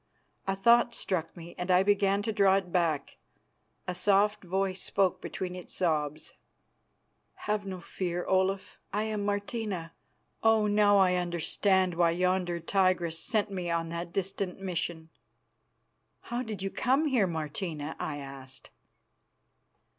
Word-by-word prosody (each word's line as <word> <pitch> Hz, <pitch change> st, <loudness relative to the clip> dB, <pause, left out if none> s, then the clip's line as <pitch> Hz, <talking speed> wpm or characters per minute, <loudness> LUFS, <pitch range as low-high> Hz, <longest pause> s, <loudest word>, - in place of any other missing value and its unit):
A 195 Hz, -, +1 dB
thought 235 Hz, +4 st, +4 dB
struck 170 Hz, -2 st, -3 dB
me, 170 Hz, 0 st, -9 dB
and 180 Hz, +1 st, -3 dB
I 180 Hz, +1 st, +5 dB
began 200 Hz, 0 st, +2 dB
to 220 Hz, -, -1 dB
draw 200 Hz, -2 st, +5 dB
it 190 Hz, -2 st, -1 dB
back. 165 Hz, -6 st, 0 dB, 0.7 s
A 180 Hz, -, -1 dB
soft 205 Hz, +3 st, +2 dB
voice 190 Hz, +1 st, -1 dB
spoke 185 Hz, -2 st, +1 dB
between 180 Hz, -1 st, -5 dB
its 180 Hz, -, -9 dB
sobs. 155 Hz, -4 st, -1 dB, 1.1 s
"Have 210 Hz, -1 st, -1 dB
no 185 Hz, -1 st, -5 dB
fear, 175 Hz, 0 st, -3 dB
Olaf. 190 Hz, +1 st, 0 dB
I 210 Hz, +2 st, 0 dB
am 215 Hz, -2 st, -2 dB
Martina. 205 Hz, -4 st, -3 dB, 0.5 s
Oh, 225 Hz, -1 st, +4 dB
now 205 Hz, -1 st, +4 dB
I 185 Hz, -2 st, +5 dB
understand 180 Hz, +2 st, +1 dB
why 170 Hz, 0 st, +3 dB
yonder 180 Hz, 0 st, 0 dB
tigress 175 Hz, -2 st, +1 dB
sent 215 Hz, +1 st, 0 dB
me 180 Hz, -3 st, -3 dB
on 165 Hz, -1 st, -1 dB
that 170 Hz, +1 st, -5 dB
distant 195 Hz, 0 st, -3 dB
mission." 170 Hz, -3 st, -3 dB, 1.1 s
"How 240 Hz, +1 st, -3 dB
did 215 Hz, -6 st, -5 dB
you 195 Hz, -, -2 dB
come 265 Hz, +5 st, +2 dB
here, 250 Hz, -9 st, +3 dB
Martina?" 160 Hz, -1 st, -4 dB
I 145 Hz, -, -3 dB
asked. 135 Hz, -2 st, -10 dB
185 Hz, 140 wpm, -29 LUFS, 170-200 Hz, 1.1 s, I